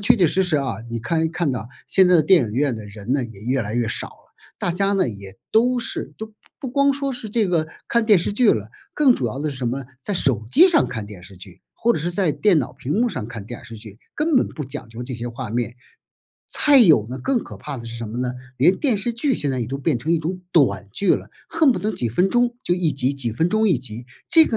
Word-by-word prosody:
确 240 +4 +4
确 185 -5 +4
实 190 +5 +2
实 175 -4 +1
啊， 130 -7 -2
你 115 - -3
看 160 +8 -1
一 160 - +1
看 165 -3 -1
到 115 -1 -5 0.2
现 190 -2 +4
在 180 - +5
的 165 - +5
电 180 +4 +5
影 105 - -4
院 135 -2 +1
的 110 -2 -8
人 105 +4 -6
呢 140 - +1
也 115 -5 -9
越 130 +3 0
来 105 +1 -4
越 120 -1 0
少 - - -1
了， - - -23 0.3
大 - - -1
家 195 +3 +1
呢 190 -6 +2
也 100 -3 -8 0.2
都 245 +3 +3
是 240 - -3
都 220 0 -8 0.3
不 265 -4 -6
光 280 +1 +3
说 275 -1 -2
是 245 -3 -4
这 215 0 +1
个 165 -3 0 0.2
看 235 -1 +1
电 210 -5 +6
视 170 - -2
剧 225 +1 +4
了， 105 0 -2 0.2
更 280 -5 +4
主 125 - -2
要 120 +4 -4
的 150 +1 -2
是 135 - -7
什 125 -2 -1
么？ 135 +2 -4 0.2
在 205 - -2
手 125 - +3
机 345 - +7
上 345 -4 +4
看 110 -4 -5
电 100 -4 -11
视 95 +1 -14
剧 90 0 -14
或 235 +1 +1
者 - - -2
是 170 +4 -1
在 175 -3 +2
电 200 -2 +3
脑 125 - -5
屏 140 - -4
幕 235 +3 +1
上 125 - -5
看 115 -5 -8
电 120 +3 -9
视 115 - -9
剧， 105 -1 -12 0.2
根 305 -1 +1
本 - - +2
不 150 - -6
讲 130 -2 -6
究 115 +2 -8
这 130 +1 -6
些 120 0 -5
画 120 -1 -7
面。 120 +1 -2 0.8
再 290 -2 +5
有 155 - +5
呢， 130 - -5
更 260 -3 -1
可 - - -11
怕 145 -2 -6
的 115 - -8
是 115 0 -7
什 115 -1 -6
么 110 - -7
呢？ 125 0 -2 0.2
连 165 +9 +4
电 260 -7 +1
视 225 +4 -1
剧 260 +4 0
现 145 - -1
在 130 -1 -2
也 115 - -2
都 135 +4 -4
变 140 -2 0
成 155 +7 -4
一 165 - +2
种 180 +4 -4
短 100 - +2
剧 195 - 0
了， - - -2 0.2
恨 320 -5 +3
不 - - -3
得 215 +1 -2
几 120 - -1
分 180 - +1
钟 240 0 +1
就 175 - +1
一 180 -3 0
集， 135 -1 +1
几 130 -4 -2
分 160 +10 0
钟 215 0 +2
一 175 - +3
集， 120 -1 -5 0.2
这 325 -2 +7
个 225 - -1
150 Hz, 300 characters per minute, -21 LUFS, -, 0.8 s, 机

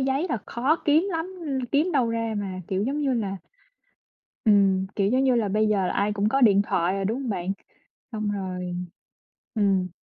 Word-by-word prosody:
giấy 270 +6 0
là 235 - -1
khó 270 +7 +1
kiếm 315 +6 +3
lắm, 335 +3 -3
ừm, 265 -4 -2
kiếm 300 +8 +1
đâu 255 -6 +2
ra 230 -1 -2
mà, 190 -2 -4
kiểu, 190 +1 0
giống 280 +5 -1
như 270 -3 +1
là 200 -4 -2 1.1
Ừm, 195 -3 +4
kiểu, 200 -1 +2
giống 260 +3 +2
như 260 -2 +4
là, 225 -4 +1
bây 215 +2 +2
giờ 195 -3 +2
là - - -1
ai 205 +1 +1
cũng 205 +1 +1
có 270 +4 +1
điện 200 -4 +6
thoại 180 -1 0
rồi, 195 0 -2
đúng 225 +6 -1
hông 260 - -4
bạn? 185 -2 -2 0.6
Xong 215 -1 -2
rồi 180 -3 -4 0.8
ừm. 195 -4 +2
215 Hz, 205 wpm, -25 LUFS, 195-265 Hz, 1.1 s, điện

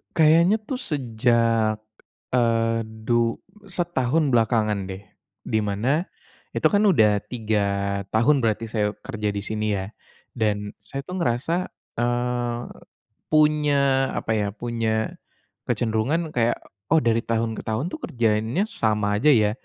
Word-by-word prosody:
Kayaknya 165 +6 +5
tuh 255 +3 -4
sejak, 115 - +1 0.5
eee, 115 -2 +2
du 115 +1 0 0.3
setahun 160 -5 0
belakangan 110 -4 +1
deh, 95 +1 -7 0.4
di 110 - 0
mana 125 - 0 0.5
itu - - -2
kan 205 +1 +3
udah 105 - +4
3 110 -3 -1 0.6
tahun 140 +6 +4
berarti 110 0 +1
saya 105 -2 0
kerja 105 -5 -4
di 100 0 -3
sini 110 0 -1
ya, 95 0 -3 0.5
dan 105 -2 -1
saya 135 0 -6
tuh 180 +4 -5
ngerasa, 125 +4 0 0.4
eee, 120 0 0 0.7
punya 145 -3 +3
apa 110 - -2
ya, 105 -1 0
punya 115 -2 -1 0.6
kecenderungan 125 +9 0
kayak, 120 -1 +1 0.3
"Oh, 160 - +6
dari 115 0 +3
tahun 115 0 0
ke - - -7
tahun 110 +9 -1
tuh - - -6
kerjaannya 115 - +1
sama 105 -2 0
aja 150 +4 +5
ya, 105 -1 +3
115 Hz, 130 wpm, -24 LUFS, 110-140 Hz, 0.7 s, Oh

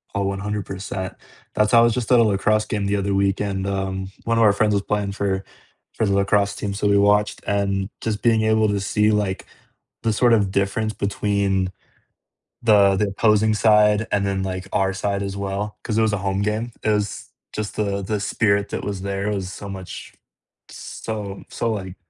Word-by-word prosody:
Oh, 100 - +1
100%. 95 -1 -4 0.4
That's 105 0 +2
how 115 - +7
I - - +7
was 115 -1 +3
just 125 0 -3
at 125 - +7
a - - +6
lacrosse 105 +1 +2
game 105 -1 -2
the 100 +1 +1
other 100 0 -1
weekend, 100 0 0
um, 95 -1 -3
one 115 0 +1
of 115 - +4
our 105 -2 +6
friends 105 +1 +2
was 100 -1 +1
playing 105 -1 -1
for 95 -1 -1 0.5
for 110 - 0
the 100 - +1
lacrosse 100 +1 +2
team, 100 -1 -3
so 105 +1 -1
we 100 0 +4
watched, 105 +1 +3
and 100 -1 0
just 110 -2 -2
being 115 -2 +4
able 110 0 +3
to 100 -1 0
see, 105 +2 +2
like, 105 -3 -1 0.6
the 115 - +1
sort 120 +2 +3
of 100 -4 +2
difference 100 +3 0
between 100 -2 0 0.9
the 100 -4 +5
the 105 +2 +1
opposing 105 +1 +3
side, 105 0 +4
and 100 -1 +1
then 95 -1 -1
like 95 0 -4
our 95 0 +1
side 100 +1 -2
as 100 0 -4
well, 100 +2 -3
'cause 110 -3 -2
it - - +4
was 110 -2 +2
a - - +1
home 95 0 -1
game. 110 +3 -1
It - - +1
was 105 -1 -1 0.2
just 105 -1 -4
the 100 -2 -1
the 105 +2 -2
spirit 100 -1 +1
that - - -4
was 100 -2 -4
there 100 +1 -2
was 95 -3 -3
so 100 - -8
much 95 -2 -8 0.6
so 105 -3 -6
so 115 - -1
like 95 -3 -5
100 Hz, 200 wpm, -22 LUFS, 100-105 Hz, 0.9 s, how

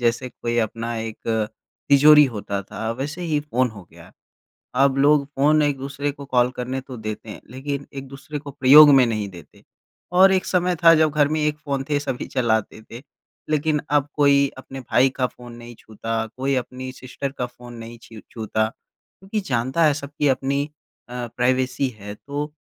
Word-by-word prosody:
जैसे 120 +2 0
कोई 120 0 -1
अपना 115 +1 -2
एक 110 -1 -5 0.7
तिजोरी 150 +1 +7
होता 105 -5 -4
था, 110 +3 -5
वैसे 145 +8 -5
ही 155 -3 0
फ़ोन 130 -4 0
हो 105 -3 -12
गया। - - -16 0.7
अब 135 -1 +2
लोग 145 0 +4
फ़ोन 150 +2 +4
एक-दूसरे 140 0 -2
को 140 0 -11
कॉल 125 -2 +2
करने 130 +2 -4
तो 130 -2 -10
देते 110 0 -6
हैं, - - -9
लेकिन 140 +2 -5
एक-दूसरे 135 +2 -7
को 145 0 -9
प्रयोग 145 +3 +8
में 130 -2 +6
नहीं 110 -3 -2
देते 85 -4 -15 0.5
और 190 +2 +6
एक 190 0 +1
समय 180 -1 +1
था 165 0 +9
जब 155 -1 +3
घर 145 -1 +3
में 155 +1 -1
एक 150 0 0
फ़ोन 140 -3 -3
थे, 145 -1 +1
सभी 130 -3 -4
चलाते 110 -3 -1
थे। 120 - -8 0.5
लेकिन 155 0 +1
अब 145 -1 +2
कोई 140 -1 +4
अपने 135 0 -9
भाई 130 +1 +2
का 130 - +1
फ़ोन 120 -1 -13
नहीं 120 0 -11
छूता, 110 +1 -4
कोई 135 +1 0
अपनी 130 +1 -4
सिस्टर 130 +1 -6
का 125 - -1
फ़ोन 120 0 -13
नहीं 115 0 -9
छीर 110 -2 -13
छूता 110 -1 -1
क्योंकि 195 - -9
जानता 130 +7 +1
है 150 -2 +5
सब 140 -1 -6
की 145 - +3
अपनी 135 +1 0 0.5
अ, 125 -1 -5
प्राइवेसी 130 +2 +1
है, 105 +1 -7
तो 145 +5 -5
135 Hz, 185 wpm, -22 LUFS, 120-145 Hz, 0.7 s, था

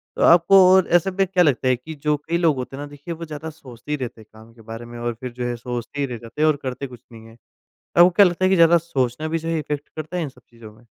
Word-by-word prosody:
तो - - -4
आपको 175 +3 +6
और 190 -1 +4
ऐसे 175 +2 +3
में 195 +1 +1
क्या 180 -1 +3
लगता 135 -5 +1
है 130 - +4
कि 155 +7 -10
जो 150 -1 +2
कई 170 +1 0
लोग 165 -4 +2
होते 130 +1 -6
हैं 140 - -6
ना, - - -7
देखिए 145 +3 -8
वो 165 0 -8
ज़्यादा 155 0 -7
सोचते 135 -4 -12
ही - - +2
रहते 120 -4 -7
हैं - - -16
काम 110 +1 -16
के 115 - -18
बारे 115 +1 -9
में 120 0 -10
और 120 0 -2
फिर 125 0 -6
जो 125 +1 -5
है, 120 - -2
सोचते 120 +3 -6
ही - - +1
रह 125 -2 -6
जाते 115 +5 -8
हैं 155 - +4
और 155 - +2
करते 130 +1 -4
कुछ 125 -2 -14
नहीं 110 -1 -13
है। 115 +1 -16 0.6
आपको 175 +1 +7
क्या 200 +3 +6
लगता 175 +1 -1
है - - +4
कि - - +4
ज़्यादा 170 0 +6
सोचना 145 -3 -2
भी 165 +1 -1
जो 165 - -6
है 165 -1 0
इफेक्ट 150 -1 -5
करता 155 +3 -6
है 175 - -1
इन 155 - -3
सब 125 -2 -19
चीज़ों 115 -2 -13
में? 115 +3 -22
145 Hz, 310 wpm, -22 LUFS, 120-165 Hz, 0.6 s, आपको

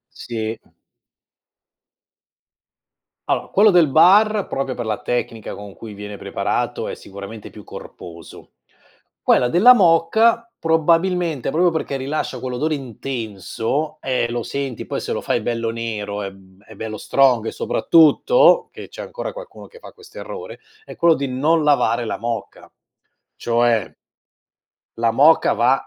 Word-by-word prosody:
Sì. 110 -1 -5 2.7
Allora, - - -1
quello 210 +2 +5
del 175 -4 +5
bar, 200 +7 +4
proprio 135 -1 -3
per 120 - -5
la 110 -1 -3
tecnica 115 -3 -3
con 100 -1 -10
cui 110 -2 -10
viene 105 0 -8
preparato, - - -3
è - - -5
sicuramente 100 +2 -10
più 105 - -13
corposo. 85 -1 -12 0.7
Quella 125 - +3
della 220 - +7
moka, 220 +5 +3
probabilmente, 165 -1 +1
proprio 175 +2 +2
perché 160 -3 -3
rilascia 135 -1 -3
quell'odore 130 +5 -2
intenso, 120 - -4
eh, 125 -3 -1
lo 120 0 -3
senti, 135 -4 -5
poi - - -4
se - - -4
lo - - -3
fai 120 - 0
bello 115 0 -2
nero, 105 -3 -4
è 95 - -5
b 95 0 -20
è 110 - -15
bello 110 0 -6
strong 125 -4 +2
e - - -3
soprattutto 440 - +4
che - - -10
c'è - - -9
ancora - - -6
qualcuno - - -11
che 475 - -16
fa - - -13
questo 440 -2 -14
errore, 480 0 -8 0.3
è - - -10
quello 170 -1 +5
di 140 0 -3
non 150 +5 +1
lavare 120 -5 +2
la - - -3
moka, 115 -2 -6 0.7
cioè 115 -3 +1 1.1
la 115 - +3
moka 155 +4 +5
va 125 +3 +3
130 Hz, 140 wpm, -20 LUFS, 115-165 Hz, 2.7 s, della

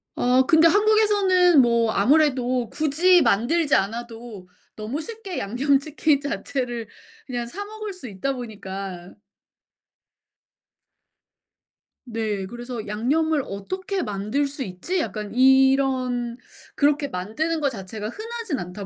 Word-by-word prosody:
아 250 +1 +3
근데 320 +1 +6
한국에서는 405 -5 +4
뭐 235 -2 +2
아무래도 255 -1 +2
굳이 325 +4 +3
만들지 285 +9 +2
않아도 225 -1 -4 0.3
너무 225 +9 -4
쉽게 430 -3 -6
양념치킨 280 +6 +1
자체를 250 -5 -3 0.4
그냥 240 -2 -4
사 400 +12 -6
먹을 430 -1 -7
수 315 -9 -10
있다 210 +7 -3
보니까. 195 -6 -7 2.9
네. 220 -4 -3
그래서 240 +1 -7
'양념을 280 +8 0
어떻게 375 - -4
만들 210 +8 -1
수 275 -1 -5
있지?' 195 - -3
약간 210 -9 -4
이런 260 -2 +3 0.4
그렇게 290 0 +2
만드는 285 - -3
것 285 - +2
자체가 210 -1 -6
흔하지는 440 - -5
않다 180 +3 -7
260 Hz, 250 characters per minute, -23 LUFS, 220-315 Hz, 2.9 s, 근데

